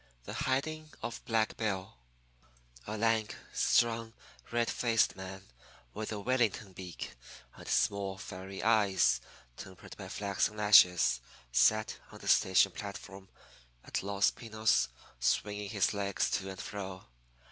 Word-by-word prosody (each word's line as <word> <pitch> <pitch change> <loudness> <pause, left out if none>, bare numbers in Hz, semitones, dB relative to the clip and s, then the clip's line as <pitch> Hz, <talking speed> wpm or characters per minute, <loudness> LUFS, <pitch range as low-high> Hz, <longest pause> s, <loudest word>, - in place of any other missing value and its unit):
THE - - -7
HIDING 155 +4 -1
OF 120 - -5
BLACK 110 -1 +1
BILL 95 -4 -2 0.9
A 110 - -3
lank, 110 -1 +1 0.2
strong, 115 -1 +2 0.4
red 120 0 +1
faced 115 -3 +2
man 95 0 -8 0.5
with 110 0 -4
a 105 - -3
Wellington 115 -3 0
beak 90 -2 -7 0.4
and - - -12
small, 100 -1 +1
fiery 95 +1 -7
eyes 95 - +3 0.4
tempered 95 -2 -10
by - - -7
flaxen 100 +1 -1
lashes, 90 -11 +6 0.3
sat 110 - +3
on - - -10
the - - -10
station 95 +1 +5
platform 100 -1 -8 0.5
at - - -3
Los 100 +1 +2
Pinos 110 -2 +1 0.3
swinging 105 +9 0
his 105 -3 +1
legs 100 -1 -1
to 95 -1 -1
and 95 0 -8
fro. 95 -3 -6
100 Hz, 125 wpm, -32 LUFS, 95-110 Hz, 0.9 s, lashes